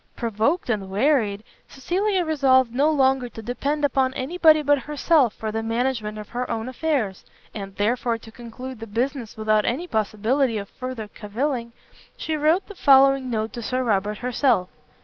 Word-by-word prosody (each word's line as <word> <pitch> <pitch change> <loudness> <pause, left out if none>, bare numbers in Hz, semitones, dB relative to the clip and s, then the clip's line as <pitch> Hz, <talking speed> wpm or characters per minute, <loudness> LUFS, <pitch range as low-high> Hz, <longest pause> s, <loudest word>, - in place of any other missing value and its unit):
Provoked 235 - 0
and 200 -4 -2
wearied, 210 -2 +1 0.2
Cecilia 370 +6 -1
resolved 260 -6 +3
no 285 +5 +3
longer 265 -4 +2
to 225 - -9
depend 285 +6 -1
upon 260 -1 +1
any 265 +7 -4
body 310 -3 +6
but 290 0 +3
herself 295 -3 +2
for 220 -1 -4
the 225 +1 -2
management 225 -1 -2
of 210 -1 -8
her 250 +1 -4
own 225 +1 -3
affairs, 255 - -2 0.3
and 195 -2 -7
therefore, 230 +2 0
to 225 0 -14
conclude 240 +2 -9
the 225 - -7
business 235 +1 -3
without 215 -1 +2
any 265 +12 -1
possibility 225 - 0
of 200 -1 -6
further 255 -4 -6
cavilling, 235 +4 -3 0.5
she 315 - -2
wrote 310 +5 +2
the 410 - -9
following 275 -5 +5
note 220 -1 -2
to 240 - -6
Sir 255 +3 -1
Robert 210 -2 0
herself. 250 -6 +1
250 Hz, 170 wpm, -23 LUFS, 220-280 Hz, 0.5 s, body